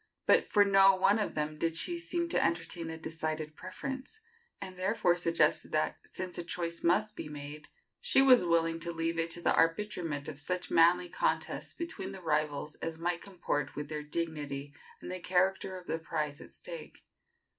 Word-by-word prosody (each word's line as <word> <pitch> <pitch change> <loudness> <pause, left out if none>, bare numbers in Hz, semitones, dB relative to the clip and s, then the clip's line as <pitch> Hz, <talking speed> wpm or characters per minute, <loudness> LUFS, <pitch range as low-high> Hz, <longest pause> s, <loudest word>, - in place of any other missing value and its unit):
But - - +5
for 205 -1 +5
no 195 -1 +6
one 195 +3 +3
of 210 - -2
them 150 0 -2
did 165 0 0
she 345 - +4
seem 340 0 -1
to - - +2
entertain 170 0 -1
a 160 - -5
decided 155 -1 -4
preference, 265 - -7 0.4
and 185 - -7
therefore 185 -1 +2
suggested 170 -1 +1
that, - - 0
since 185 -1 -5
a - - -3
choice 170 0 -3
must 210 +5 +2
be - - -6
made, 145 0 -8 0.3
she 485 - +3
was 260 -5 +7
willing 165 -1 +2
to 170 +1 -3
leave 165 0 -1
it 165 0 0
to 170 +1 0
the - - +3
arbitrament 165 -4 0
of 145 -2 -6
such 180 +4 -3
manly 175 +2 +5
contest - - -2
between 215 - -5
the 190 - -8
rivals 150 -2 -1
as 165 -1 -4
might 170 +1 -1
comport 170 -7 -3
with 145 0 -5
their 155 -1 -3
dignity 150 -3 -4 0.3
and - - -7
the 185 - -4
character 185 +1 +1
of 180 - -11
the 165 - -2
prize 150 -3 -3
at - - -12
stake. - - -10
170 Hz, 185 wpm, -31 LUFS, 155-190 Hz, 0.4 s, was